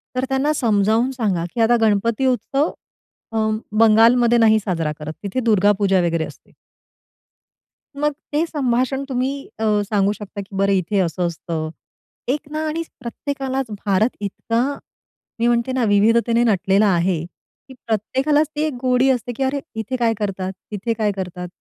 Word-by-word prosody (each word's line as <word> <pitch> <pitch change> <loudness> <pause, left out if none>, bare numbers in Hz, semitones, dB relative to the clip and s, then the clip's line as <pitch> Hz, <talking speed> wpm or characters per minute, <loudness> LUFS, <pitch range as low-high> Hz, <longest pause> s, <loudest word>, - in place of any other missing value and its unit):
तर 255 +1 0
त्यांना 270 +3 +1
समजावून 225 0 +2
सांगा, 205 -10 -1
की 235 - -1
आता 235 +2 +4
गणपती 220 +3 +2
उत्सव 270 +4 +1 0.6
अ, - - -1 0.4
बंगालमध्ये 230 +2 +5
नाही 220 -1 +5
साजरा 170 -6 -2
करत 155 +1 -6
तिथे 200 +5 -2
दुर्गा 205 -2 +4
पूजा 195 -2 +3
वगैरे 165 -2 0
असते. - - -15 1.5
मग 295 0 +2 0.2
ते 305 +3 +2
संभाषण 265 -3 0
तुम्ही, 260 +1 0 0.3
अ, - - -2 0.3
सांगू 200 -2 +2
शकता, 205 0 -7
की 195 0 -11
"बरं, 195 0 +2
इथे 185 +1 -1
हे 195 - +4
असं 175 0 -1
असतं. 165 -1 -4 0.6
एक 285 +2 -1
ना 310 +1 -2
आणि 325 +2 -2 0.2
प्रत्येकालाच 270 +2 -3 0.2
भारत 205 +4 +2
इतका" 230 +3 -1 0.8
मी 235 - +2
म्हणते 240 +1 +1
ना, 255 -1 0
"विविधतेने 230 +3 +3
नटलेला 200 -1 +3
आहे, 170 -1 +1
की 220 +8 -19
प्रत्येकालाच 265 +8 +1
ती 295 - -1
एक 310 - -2
गोडी 255 +1 +3
असते," 245 -2 0
की 270 - 0
"अरे, 270 +2 0 0.2
इथे 220 +3 -3
काय 235 -2 +2
करतात? 190 -2 -2 0.2
तिथे 210 +3 -2
काय 215 -2 0
करतात?" 180 -1 -5
225 Hz, 160 wpm, -21 LUFS, 195-260 Hz, 1.5 s, बंगालमध्ये